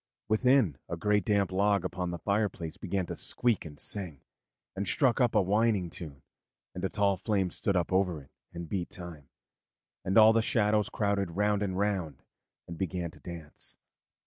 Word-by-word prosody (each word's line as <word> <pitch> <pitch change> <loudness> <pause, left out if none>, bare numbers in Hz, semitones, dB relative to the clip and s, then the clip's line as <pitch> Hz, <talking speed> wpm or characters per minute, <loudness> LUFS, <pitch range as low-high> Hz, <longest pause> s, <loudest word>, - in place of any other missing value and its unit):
Within, 110 - +3
a - - -3
great 105 -1 +2
damp 100 -2 +1
log 100 0 +2
upon 90 -1 -3
the 85 - -4
fireplace 100 -3 -1
began 95 0 -2
to - - -5
squeak 120 -7 +1
and 75 -2 -10
sing, 90 -9 -3 0.5
and 100 0 -3
struck 130 -2 +2
up 120 -2 +2
a 105 - +6
whining 100 -2 +1
tune, 70 -6 -9 0.5
and 90 - -6
a 95 - +1
tall 100 -2 +1
flame 95 -2 0
stood 100 - -1
up 90 +1 -1
over 90 -4 +1
it - - -23 0.2
and 85 0 -7
beat 90 0 -3
time, 85 -8 -10 0.7
and 95 - +1
all 110 0 +8
the 115 - +3
shadows 105 -2 +2
crowded 100 -3 0
round 105 +3 +1
and 95 -6 -1 0.6
began 90 -3 -2
to - - -17
dance. 85 -4 -7
95 Hz, 170 wpm, -30 LUFS, 85-105 Hz, 0.7 s, all